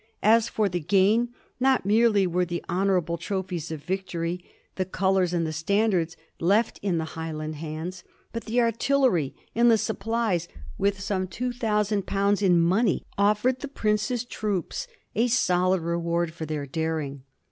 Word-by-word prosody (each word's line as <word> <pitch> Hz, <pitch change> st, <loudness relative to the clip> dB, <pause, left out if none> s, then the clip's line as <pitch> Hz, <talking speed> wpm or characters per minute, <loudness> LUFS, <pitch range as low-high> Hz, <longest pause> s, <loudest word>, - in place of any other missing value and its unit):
As 225 Hz, +2 st, +5 dB
for 215 Hz, -2 st, +1 dB
the 175 Hz, -2 st, -2 dB
gain, 205 Hz, +8 st, +3 dB, 0.3 s
not 260 Hz, -4 st, +3 dB
merely 210 Hz, -1 st, +4 dB
were 180 Hz, 0 st, +1 dB
the 175 Hz, -1 st, -4 dB
honorable 180 Hz, -2 st, +1 dB
trophies 185 Hz, -5 st, -3 dB
of 155 Hz, -2 st, -6 dB
victory, 180 Hz, -1 st, -3 dB, 0.3 s
the 190 Hz, -, -1 dB
colors 190 Hz, -1 st, +1 dB
and 170 Hz, -2 st, 0 dB
the 155 Hz, -, -3 dB
standards, 175 Hz, 0 st, +1 dB, 0.2 s
left 205 Hz, +7 st, +2 dB
in 190 Hz, -4 st, 0 dB
the 160 Hz, -, -1 dB
Highland 155 Hz, -2 st, -5 dB
hands, 160 Hz, +4 st, -6 dB, 0.3 s
but 230 Hz, -, -5 dB
the 235 Hz, +2 st, +2 dB
artillery 230 Hz, -, +2 dB, 0.2 s
and 235 Hz, +1 st, +4 dB
the 225 Hz, -, +6 dB
supplies, 215 Hz, -5 st, -1 dB, 0.3 s
with 200 Hz, -1 st, 0 dB
some 190 Hz, -1 st, -1 dB
two 245 Hz, +8 st, -3 dB
thousand 210 Hz, -4 st, 0 dB
pounds 200 Hz, +1 st, +1 dB
in 180 Hz, -4 st, +4 dB
money, 190 Hz, +5 st, +2 dB
offered 210 Hz, +6 st, +2 dB
the 290 Hz, -, -5 dB
prince's 225 Hz, -1 st, 0 dB
troops 215 Hz, -, -3 dB, 0.3 s
a 235 Hz, +2 st, +2 dB
solid 185 Hz, -6 st, +2 dB
re 170 Hz, +1 st, -1 dB
ward 170 Hz, -1 st, -1 dB
for 160 Hz, -2 st, -6 dB
their 150 Hz, -2 st, -3 dB
daring. 155 Hz, -2 st, -3 dB
190 Hz, 160 wpm, -26 LUFS, 170-220 Hz, 0.3 s, the